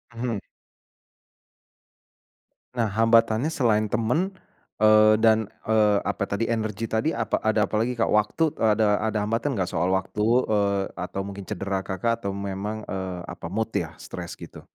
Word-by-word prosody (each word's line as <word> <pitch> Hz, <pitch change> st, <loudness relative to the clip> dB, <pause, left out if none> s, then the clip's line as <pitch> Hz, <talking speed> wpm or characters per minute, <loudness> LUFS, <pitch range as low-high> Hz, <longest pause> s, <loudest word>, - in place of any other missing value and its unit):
Mhm. 115 Hz, -2 st, -2 dB, 2.4 s
Nah, 115 Hz, -, +2 dB
hambatannya 115 Hz, +4 st, +3 dB
selain 110 Hz, -8 st, +1 dB
teman, 120 Hz, -, 0 dB, 0.5 s
eee, 110 Hz, 0 st, +6 dB
dan, 110 Hz, -1 st, +3 dB, 0.2 s
eee, 105 Hz, -2 st, +3 dB
apa -, -, -1 dB
tadi, 100 Hz, +3 st, -1 dB
energi 110 Hz, -1 st, -2 dB
tadi, 110 Hz, +6 st, 0 dB
apa 115 Hz, -6 st, -1 dB
ada 110 Hz, -1 st, +2 dB
apa -, -, -5 dB
lagi 125 Hz, +1 st, -1 dB
Kak? 115 Hz, -, +2 dB
waktu 105 Hz, +9 st, +2 dB
e 115 Hz, -, -1 dB
ada 105 Hz, -2 st, +2 dB
ada 110 Hz, 0 st, -1 dB
hambatan 115 Hz, +4 st, -1 dB
nggak 95 Hz, -2 st, -1 dB
soal 85 Hz, +3 st, +1 dB
waktu, 95 Hz, +2 st, -1 dB, 0.2 s
eee, 100 Hz, -2 st, +1 dB
atau 95 Hz, +1 st, -4 dB
mungkin 100 Hz, -1 st, -8 dB
cedera 100 Hz, -1 st, -2 dB
Kakak 115 Hz, +5 st, -2 dB
atau 100 Hz, -, -2 dB
memang, 100 Hz, +2 st, -4 dB
eee, 95 Hz, -2 st, -4 dB
apa, 85 Hz, -, -8 dB
mood 110 Hz, +4 st, -2 dB
ya, -, -, -3 dB
stres -, -, -8 dB
gitu? -, -, -11 dB
110 Hz, 155 wpm, -25 LUFS, 100-115 Hz, 2.4 s, eee